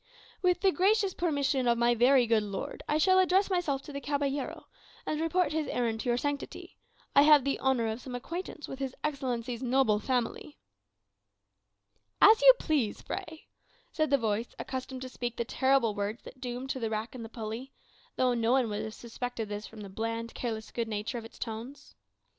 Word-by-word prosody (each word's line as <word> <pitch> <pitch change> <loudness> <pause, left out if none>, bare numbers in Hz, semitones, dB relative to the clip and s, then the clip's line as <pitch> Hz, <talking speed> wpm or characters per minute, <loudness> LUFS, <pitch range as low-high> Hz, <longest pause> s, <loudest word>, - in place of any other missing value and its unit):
"With 360 -1 +2
the 385 -1 +4
gracious 395 +1 +2
permission 285 -6 0
of 235 0 +3
my 235 0 +4
very 245 +2 +5
good 225 -1 +3
lord, 200 -2 -5
I 300 - +3
shall 375 +4 +5
address 375 +2 +3
myself 300 -7 0
to 295 - -10
the 280 - -4
caballero, 285 -1 -2 0.4
and 305 0 -1
report 355 +2 +1
his 315 -1 -1
errand 230 -2 -1
to 245 - -2
your 240 - +2
sanctity. 285 +2 -4 0.4
I 280 - +9
have 295 -2 +7
the 275 +1 -1
honour 265 -3 +2
of 220 +2 -3
some 255 -2 -7
acquaintance 320 +4 -6
with 270 - -7
his 265 -1 -3
Excellency's 250 -5 -2
noble 255 -4 +3
family." 250 +4 -2 1.6
"As 435 +1 +7
you - - +11
please, 285 - -1
Fray," 320 0 -6 0.5
said 310 -1 0
the 280 - +4
voice 225 -1 -2
accustomed 260 0 -5
to 260 - -6
speak 240 -1 -4
the 235 - -1
terrible 260 -3 +2
words 205 +2 -3
that 260 - -12
doomed 250 +1 -4
to 260 - -3
the 225 -2 -1
rack 220 +2 -3
and 250 -3 -7
the 225 - -8
pulley, 225 +3 -6 0.4
though 255 -1 +2
no 235 0 +2
one 260 -4 +3
would 210 0 -2
have 220 - -6
suspected 235 -2 -5
this 205 0 -5
from 220 -1 -11
the 200 - -7
bland, 230 +3 -4
careless 220 -3 -4
good 235 -1 -2
nature 220 +3 -3
of 225 - -10
its 225 - -13
tones. 240 +5 -7
255 Hz, 195 wpm, -30 LUFS, 230-285 Hz, 1.6 s, you